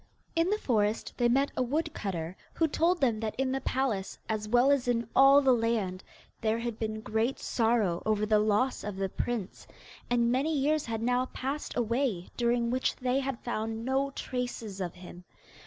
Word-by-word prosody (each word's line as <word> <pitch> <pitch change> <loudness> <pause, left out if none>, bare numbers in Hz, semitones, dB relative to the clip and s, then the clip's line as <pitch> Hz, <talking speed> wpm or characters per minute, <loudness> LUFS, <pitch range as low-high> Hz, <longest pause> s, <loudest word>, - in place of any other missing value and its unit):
In 330 +2 +2
the 420 - +2
forest 215 - 0
they 240 -1 +3
met 275 +3 +2
a - - 0
woodcutter, 210 - -2 0.2
who 325 - +3
told 340 +4 +2
them 235 -5 +2
that 220 -1 -3
in 265 0 0
the 270 0 -1
palace, 240 -8 -1
as 215 -1 -2
well 245 +4 +5
as 275 -3 +2
in 235 -2 +1
all 275 +1 +7
the 265 -1 +5
land, 225 -6 0 0.4
there 220 0 +1
had 230 -1 -4
been 220 -1 -3
great 225 +4 0
sorrow 220 -7 +1
over 215 -1 +1
the 215 0 +3
loss 215 +5 +1
of 210 -1 -4
the 195 0 -2
prince, 230 -1 -4 0.4
and 235 -1 +2
many 290 +5 +1
years 295 +1 +1
had 225 -1 -3
now 250 +1 +1
passed 275 +3 -4
away 235 -5 0
during 235 -1 +1
which 255 +1 0
they 255 +1 0
had 270 -3 -3
found 225 -1 -3
no 270 +2 +1
traces 245 -7 -4
of 175 -2 -4
him. 180 0 -11
235 Hz, 185 wpm, -29 LUFS, 215-265 Hz, 0.4 s, all